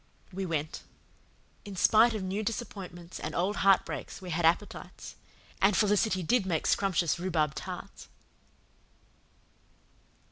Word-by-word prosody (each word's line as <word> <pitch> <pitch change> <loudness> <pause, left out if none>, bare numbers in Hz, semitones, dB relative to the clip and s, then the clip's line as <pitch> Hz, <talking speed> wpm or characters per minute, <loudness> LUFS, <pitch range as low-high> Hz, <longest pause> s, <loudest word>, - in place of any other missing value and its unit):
We 190 0 -3
went. 155 -2 -3 0.8
In 200 -1 -8
spite 220 +5 +5
of 205 - -3
new 190 +3 -2
disappointments 195 -6 -6
and 155 - -5
old 190 +4 0
heartbreaks 195 -1 +1
we 185 -2 -7
had 165 +1 0
appetites. 175 +5 -2 0.5
And 195 0 +4
Felicity 210 -2 +2
did 240 +6 +2
make 175 -4 -1
scrumptious 180 -4 +1
rhubarb 160 -5 0
tarts! - - -8
190 Hz, 115 wpm, -29 LUFS, 170-205 Hz, 0.8 s, spite